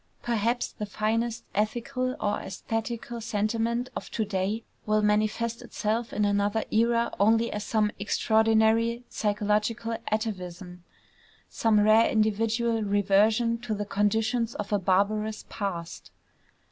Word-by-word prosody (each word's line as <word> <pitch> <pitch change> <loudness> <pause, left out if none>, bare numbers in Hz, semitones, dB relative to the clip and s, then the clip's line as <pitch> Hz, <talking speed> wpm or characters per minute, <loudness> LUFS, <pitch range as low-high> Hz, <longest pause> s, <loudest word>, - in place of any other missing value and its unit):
Perhaps 235 +1 0
the 210 - -6
finest 225 +3 -1
ethical 255 +5 -1
or 205 0 0
æsthetical 225 +3 -4
sentiment 225 +3 -1
of - - -5
to 220 - -1
day 200 +2 -2 0.2
will 215 0 +2
manifest 215 +2 +1
itself 225 +2 -2
in 210 - 0
another 205 +2 +1
era 235 +1 +2
only 225 +3 +3
as 210 - -3
some 215 -2 +1
extraordinary 220 +2 +2
psychological 210 +2 0 0.2
atavism, 180 -5 -4 0.7
some 220 -2 +2
rare 215 +2 +5
individual 225 +2 +1
reversion 210 +3 +2
to 230 -2 -3
the 205 0 -3
conditions 220 +3 0
of 210 0 -4
a 205 - +3
barbarous 210 +3 0
past. 175 -5 -5
215 Hz, 120 wpm, -27 LUFS, 205-230 Hz, 0.7 s, rare